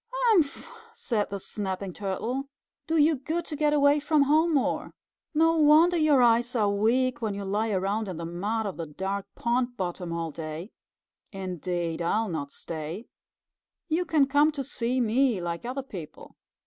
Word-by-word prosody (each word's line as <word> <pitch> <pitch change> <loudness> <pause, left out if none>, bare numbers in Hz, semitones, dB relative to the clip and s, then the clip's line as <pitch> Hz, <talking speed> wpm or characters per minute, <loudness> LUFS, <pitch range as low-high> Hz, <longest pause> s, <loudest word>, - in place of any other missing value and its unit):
"Humph!" 445 - +2 0.3
said 235 - -1
the 200 - -4
Snapping 190 -1 -4
Turtle. 230 +9 -3 0.4
"Do 325 0 +1
you 305 0 +4
good 320 +6 -3
to 305 - -5
get 300 0 +2
away 290 0 +4
from 295 0 +3
home 310 +4 +3
more. 275 - -1 0.4
No 325 +1 +4
wonder 315 +3 +6
your 305 -6 +4
eyes 240 +1 +3
are 210 -3 +2
weak, 240 +6 +1
when 215 -3 -2
you 200 0 -5
lie 210 +3 0
around 200 +2 -1
in 180 - -5
the 170 - -5
mud 205 +7 -2
of 195 - -4
the 165 -2 -4
dark 190 +6 -4
pond 245 +1 -1
bottom 180 -1 -4
all 165 -1 -3
day. 160 +5 -7 0.6
Indeed, 180 -3 -3
I'll 215 +6 0
not 145 -4 -4
stay. 165 +6 -6 0.8
You 325 +3 +1
can 305 -4 +3
come 290 +3 +3
to 280 -2 -3
see 250 -1 -1
me 240 -1 +2
like 170 +3 -4
other 265 +2 -3
people." 180 - -10
230 Hz, 170 wpm, -27 LUFS, 185-285 Hz, 0.8 s, wonder